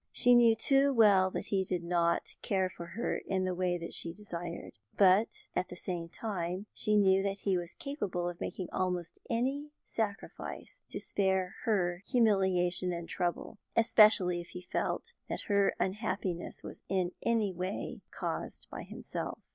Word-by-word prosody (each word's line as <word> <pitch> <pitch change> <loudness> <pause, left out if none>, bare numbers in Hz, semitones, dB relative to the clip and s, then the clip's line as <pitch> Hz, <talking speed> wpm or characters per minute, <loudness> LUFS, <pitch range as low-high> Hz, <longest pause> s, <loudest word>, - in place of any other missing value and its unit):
She 245 -1 +5
knew 235 -2 +7
too 275 +4 +3
well 200 -4 +6
that - - -4
he 195 -2 +2
did 180 -2 -2
not 170 0 +1
care 190 -2 0
for 170 - -8
her 235 - -1
in 190 -1 0
the 185 - 0
way 180 0 0
she 165 0 -3
desired, 175 - -7 0.2
but 195 +2 +6 0.3
at 185 - 0
the - - -7
same 175 -2 -4
time 185 -1 -3
she 215 -1 +2
knew 195 -1 +5
that 195 0 -2
he 195 -2 +2
was 175 -1 -4
capable 205 -11 -3
of 175 -1 -6
making 185 - -4
almost 180 -2 -2
any 270 +5 0 0.2
sacrifice 215 -2 -4
to - - -4
spare 190 -1 0
her 180 -6 +1
humiliation 190 -6 +2
and 170 -1 -5
trouble, 175 +4 -2 0.2
especially 210 -6 +5
if 170 - -11
he 180 +1 -8
felt 460 - -2 0.2
that - - -3
her 200 -1 +2
unhappiness 190 -3 -2
was - - -9
in 185 -2 +1
any 220 -4 +1
way 185 +3 -4
caused - - -4
by - - -5
himself. - - -5
190 Hz, 160 wpm, -32 LUFS, 175-210 Hz, 0.3 s, knew